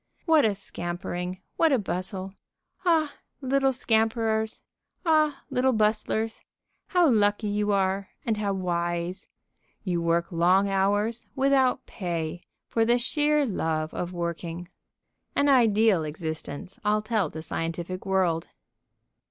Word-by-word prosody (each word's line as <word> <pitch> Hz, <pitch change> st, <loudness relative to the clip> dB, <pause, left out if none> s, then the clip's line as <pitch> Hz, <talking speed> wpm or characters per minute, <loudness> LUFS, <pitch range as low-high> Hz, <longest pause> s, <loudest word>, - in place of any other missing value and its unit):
What 320 Hz, -5 st, +5 dB
a 210 Hz, -2 st, +2 dB
scampering! 180 Hz, -1 st, -5 dB, 0.2 s
What 325 Hz, -2 st, +4 dB
a 270 Hz, -, +4 dB
bustle! 190 Hz, -1 st, -3 dB, 0.5 s
Ah, 320 Hz, -4 st, +2 dB, 0.3 s
little 270 Hz, 0 st, +2 dB
scamperers! 220 Hz, -2 st, 0 dB, 0.4 s
Ah, 310 Hz, -3 st, +3 dB
little 260 Hz, +1 st, +2 dB
bustlers! 220 Hz, +1 st, 0 dB, 0.5 s
How 355 Hz, -3 st, +4 dB
lucky 210 Hz, -3 st, +3 dB
you 205 Hz, 0 st, 0 dB
are, 195 Hz, 0 st, 0 dB, 0.2 s
and 225 Hz, -2 st, 0 dB
how 205 Hz, -1 st, 0 dB
wise! 175 Hz, -1 st, -2 dB, 0.6 s
You 175 Hz, -4 st, -1 dB
work 170 Hz, +2 st, +1 dB
long 180 Hz, +4 st, +3 dB
hours, 205 Hz, +4 st, 0 dB
without 265 Hz, -1 st, +2 dB
pay, 170 Hz, -3 st, -4 dB, 0.3 s
for 225 Hz, -, +1 dB
the 240 Hz, +2 st, +3 dB
sheer 295 Hz, +4 st, +1 dB
love 160 Hz, -7 st, -1 dB
of 175 Hz, 0 st, -3 dB
working. 170 Hz, 0 st, -4 dB, 0.7 s
An 285 Hz, -, +3 dB
ideal 220 Hz, -, +4 dB
existence, 160 Hz, +4 st, -6 dB
I'll 210 Hz, 0 st, +2 dB
tell 215 Hz, -7 st, 0 dB
the 160 Hz, +1 st, -7 dB
scientific 165 Hz, +3 st, -4 dB
world. 185 Hz, -4 st, +1 dB
200 Hz, 120 wpm, -26 LUFS, 175-235 Hz, 0.7 s, What